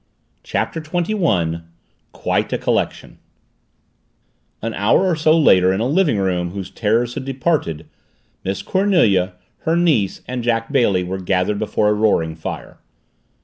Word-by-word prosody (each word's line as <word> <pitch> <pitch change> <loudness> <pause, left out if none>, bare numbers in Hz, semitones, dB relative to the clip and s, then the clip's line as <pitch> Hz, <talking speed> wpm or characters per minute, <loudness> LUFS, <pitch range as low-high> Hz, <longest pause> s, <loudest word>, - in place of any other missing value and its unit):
CHAPTER 165 - -2
TWENTY 175 +5 -2
ONE 85 - 0 0.5
QUITE - - -1
A - - +1
COLLECTION - - -2 1.4
An 115 0 -4
hour 105 - +2
or 180 -3 +2
so 155 +1 +3
later 95 - +5
in 95 - -1
a 115 - 0
living 150 - +2
room 90 -3 0
whose 95 +1 -7
terrors 115 +2 0
had 135 - -5
departed, 130 - -1 0.6
Miss 95 +1 -3
Cornelia, 120 - +2 0.3
her 160 - 0
niece, 155 - +1
and 125 -1 -4
Jack 115 0 0
Bailey 110 -10 +2
were 95 +2 -4
gathered 95 +2 0
before 105 -1 +1
a - - +3
roaring 105 -7 +1
fire. 80 - -7
110 Hz, 145 wpm, -19 LUFS, 95-155 Hz, 1.4 s, later